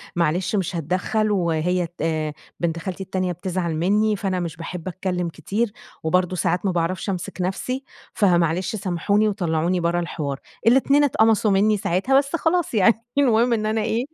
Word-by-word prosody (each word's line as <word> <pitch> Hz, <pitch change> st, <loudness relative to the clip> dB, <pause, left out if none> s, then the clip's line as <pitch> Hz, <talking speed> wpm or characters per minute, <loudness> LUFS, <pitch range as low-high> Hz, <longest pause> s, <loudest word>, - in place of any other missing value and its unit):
معلش 175 Hz, +4 st, +1 dB
مش 190 Hz, -2 st, -1 dB
هاتدخّل 185 Hz, +6 st, 0 dB
وهي 175 Hz, -1 st, +1 dB
تـآآ 155 Hz, -1 st, -1 dB, 0.3 s
بنت 170 Hz, -1 st, -1 dB
خالتي 190 Hz, +2 st, -5 dB
التانية 185 Hz, -1 st, -2 dB
بتزعل 175 Hz, -1 st, -3 dB
منّي، 210 Hz, +6 st, +2 dB
فأنا 190 Hz, -2 st, -2 dB
مش 170 Hz, -2 st, -4 dB
باحب 170 Hz, +1 st, -6 dB
اتكلّم 180 Hz, -1 st, -2 dB
كتير، 205 Hz, +7 st, -2 dB, 0.3 s
وبرضه 180 Hz, +2 st, +1 dB
ساعات 180 Hz, +2 st, 0 dB
ما 190 Hz, -, +2 dB
باعرفش 175 Hz, +3 st, -1 dB
امسك 180 Hz, -1 st, -4 dB
نفْسي، 250 Hz, +9 st, -2 dB, 0.3 s
فمعلش 175 Hz, 0 st, +2 dB
سامحوني 200 Hz, +2 st, +1 dB
وطلَّعوني 175 Hz, -3 st, 0 dB
برّه 170 Hz, 0 st, +1 dB
الحوار" 145 Hz, -5 st, -3 dB, 0.3 s
الاتنين 275 Hz, +4 st, +5 dB
اتقمصوا 220 Hz, -5 st, +3 dB
منّي 210 Hz, +2 st, +3 dB
ساعتها 195 Hz, +9 st, +1 dB
بس 280 Hz, +4 st, +1 dB
خلاص 335 Hz, -1 st, 0 dB
يعني 220 Hz, +1 st, +5 dB, 0.2 s
المهم 240 Hz, -3 st, +4 dB
إن 215 Hz, -2 st, 0 dB
أنا 220 Hz, +1 st, 0 dB
إيه 230 Hz, +3 st, -1 dB
185 Hz, 155 wpm, -23 LUFS, 170-215 Hz, 0.3 s, الاتنين